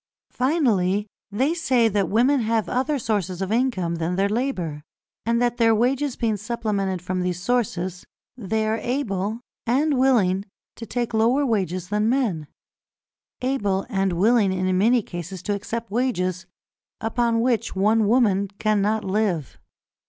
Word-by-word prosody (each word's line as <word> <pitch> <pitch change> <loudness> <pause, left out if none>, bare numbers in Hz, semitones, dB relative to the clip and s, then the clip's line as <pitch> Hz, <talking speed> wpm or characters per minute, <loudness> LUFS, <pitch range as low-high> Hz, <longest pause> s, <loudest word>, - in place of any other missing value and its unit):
Finally, 220 - +1 0.2
they 260 +10 +1
say 260 -9 +2
that 200 -4 0
women 255 +6 +3
have 225 -1 0
other 265 +4 0
sources 200 -7 -2
of 190 +1 -3
income 215 -9 0
than 165 +2 -1
their 195 +2 +2
labour, 200 - -2 0.5
and 235 0 +2
that 240 0 +1
their 225 -1 +4
wages 260 +4 +1
being 225 -3 0
supplemented 205 -4 -2
from 185 0 -2
these 180 -1 -2
sources, 185 -4 -1 0.3
they 220 -1 -1
are 220 +1 0
able 220 -3 -2 0.3
and 275 +3 +2
willing 200 -8 +3 0.3
to 230 - -8
take 240 -1 -2
lower 235 +6 +3
wages 185 - -1
than 210 +1 +1
men, 220 - 0 0.9
able 205 -7 0
and 195 -2 +1
willing 205 +2 +3
in 185 0 0
many 230 +5 +3
cases 175 +1 -7
to 205 - -1
accept 225 +2 -5
wages 185 -7 -1 0.5
upon 230 0 0
which 235 -4 0
one 215 +2 +3
woman 205 -4 +3
cannot 215 0 +1
live. 190 - -1
215 Hz, 145 wpm, -23 LUFS, 190-240 Hz, 0.9 s, their